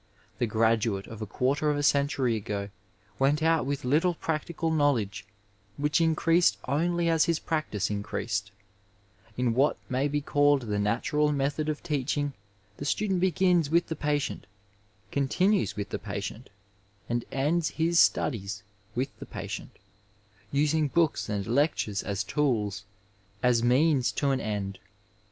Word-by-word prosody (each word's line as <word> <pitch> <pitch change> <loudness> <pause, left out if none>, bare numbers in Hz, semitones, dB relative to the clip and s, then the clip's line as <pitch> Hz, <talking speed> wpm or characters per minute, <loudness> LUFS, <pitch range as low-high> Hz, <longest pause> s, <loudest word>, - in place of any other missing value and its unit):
The 120 - +1
graduate 110 -2 +1
of 115 -1 -10
a 110 - -4
quarter 140 +8 0
of 145 - +1
a 145 - -1
century 140 -4 +2
ago 100 -1 -4 0.5
went 145 +3 +2
out 160 -4 +2
with 140 -1 -3
little 165 +7 +2
practical 160 +1 -2
knowledge, 125 -11 +1 0.5
which 150 +2 +1
increased 165 +1 +3
only 170 +5 +1
as 165 -2 +4
his 170 -1 +1
practice 155 - -2
increased; 105 0 -3 0.9
In 125 -2 +1
what 135 +5 +2
may 130 +3 +1
be 145 0 0
called 145 -1 +3
the 105 -3 -2
natural 140 +8 +1
method 145 +2 -1
of 150 - -3
teaching 145 0 -1 0.4
the - - -6
student 190 +4 0
begins 180 -3 +2
with 170 +2 +2
the 160 - -2
patient, 145 -8 -2 0.6
continues 180 - +1
with 100 -1 -4
the - - -3
patient, - - -6 0.6
and 120 0 -1
ends 155 +5 +1
his 165 +1 +1
studies 100 -6 +1 0.3
with 130 +3 0
the - - -8
patient, - - -7 0.7
using 150 +2 +2
books 160 -4 +1
and 100 -2 -2
lec 145 +7 +2
tures 100 -3 -2
as 100 -1 -2
tools, 105 -6 -1 0.6
as 125 -2 +4
means 130 +2 +3
to 140 -1 +1
an 135 - +1
end. 100 -2 -3
140 Hz, 145 wpm, -28 LUFS, 115-155 Hz, 0.9 s, as